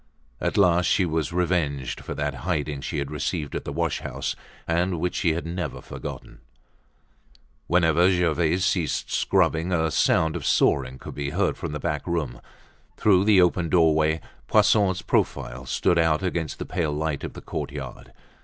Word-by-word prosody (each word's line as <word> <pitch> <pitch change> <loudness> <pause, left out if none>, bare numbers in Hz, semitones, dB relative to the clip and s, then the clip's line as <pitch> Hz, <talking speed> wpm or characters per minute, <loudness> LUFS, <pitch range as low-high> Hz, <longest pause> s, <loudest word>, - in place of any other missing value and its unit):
At - - -1
last 90 -3 +4
she 95 - +3
was 80 -1 -1
revenged 85 -7 -1
for - - -6
that 75 0 -2
hiding 75 -4 -2
she - - -4
had 70 0 -3
received 75 +1 -3
at - - -4
the - - -4
wash 85 +1 -1
house, - - -4 0.3
and 85 +1 0
which 90 +2 -1
she 85 - +1
had 85 +1 -4
never 90 +2 -4
forgotten. - - -8 1.3
Whenever 85 +1 +4
Gervaise 90 0 +1
ceased 90 -5 -1
scrubbing, 80 +3 +2
a 80 -2 +1
sound 80 0 +2
of - - -4
sawing 65 -2 +2
could - - -9
be 70 -1 -3
heard 95 +5 0
from 80 -4 -5
the 75 - -4
back 75 -3 -3
room. 75 -9 -2 0.6
Through 95 -2 +4
the 100 -4 +6
open 90 -1 +1
doorway, 80 -2 +3 0.3
Poisson's 95 -3 +3
profile 65 +2 -1
stood 85 +7 +2
out 80 0 +2
against 85 -4 -2
the - - -5
pale 80 -3 -1
light 75 -1 -2
of - - -5
the - - -9
courtyard. 70 -3 -6
80 Hz, 165 wpm, -25 LUFS, 75-90 Hz, 1.3 s, the